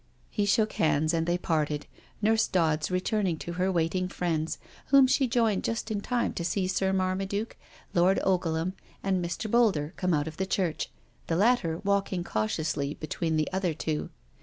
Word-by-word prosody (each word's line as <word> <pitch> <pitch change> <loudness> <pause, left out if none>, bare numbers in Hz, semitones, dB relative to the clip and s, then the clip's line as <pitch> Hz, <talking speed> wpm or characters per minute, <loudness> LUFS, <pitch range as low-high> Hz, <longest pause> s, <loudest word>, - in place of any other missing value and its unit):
He 205 -2 0
shook 215 +2 +3
hands 155 0 +2
and 165 0 0
they 175 +1 +2
parted, 155 -4 -1 0.4
Nurse 220 +1 +3
Dodds 160 -4 +1
re 180 0 +1
turning 190 -3 0
to 170 - -6
her 185 +2 +1
waiting 180 +1 0
friends, 165 -3 -1 0.3
whom 275 -1 +7
she 265 +1 +2
joined 230 -4 +1
just 225 0 -2
in 205 -2 -1
time 245 +2 0
to 170 - -3
see 185 +2 0
Sir 190 0 +1
Marmaduke, 190 +3 -1 0.4
Lord 180 +2 +4
Ogleham, 175 -2 +1 0.3
and 190 -2 +1
Mr. 175 +6 -3
Boulder 205 -9 +2
come 180 -3 +1
out 145 +1 0
of 160 0 -7
church, 180 -6 -1 0.4
the 165 - 0
latter 195 -5 +2
walking 200 -2 0
cautiously 145 +4 -1
between 160 +1 -2
the 155 - +1
other 185 -4 0
two. 155 -1 -2
180 Hz, 170 wpm, -28 LUFS, 160-200 Hz, 0.4 s, whom